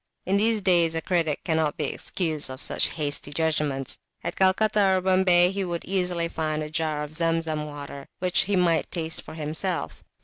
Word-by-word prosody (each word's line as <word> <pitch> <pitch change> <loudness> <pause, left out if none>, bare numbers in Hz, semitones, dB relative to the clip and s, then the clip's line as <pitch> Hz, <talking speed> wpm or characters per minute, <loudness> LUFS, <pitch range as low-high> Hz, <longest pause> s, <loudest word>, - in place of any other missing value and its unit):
In 195 +2 +1
these 220 +1 +3
days 170 -4 +3
a 165 - 0
critic 165 -5 0
cannot 160 -3 0
be 150 - -1
excused 160 -5 0
for 130 - -5
such - - +2
hasty 145 -2 -1
judgments; 150 -4 0 0.2
at - - -3
Calcutta 195 0 +3
or - - +1
Bombay 185 -1 +4
he 195 0 -2
would 175 -2 -4
easily 180 -3 0
find 155 -2 -2
a 150 - -7
jar 155 -2 -1
of 150 +1 -8
Zemzem 165 -2 -1
water, 140 -1 -9
which 180 -1 +1
he 200 +1 0
might 175 -3 +2
taste 165 -2 -3
for - - -11
himself. 160 +3 -3
165 Hz, 180 wpm, -25 LUFS, 155-185 Hz, 0.2 s, Bombay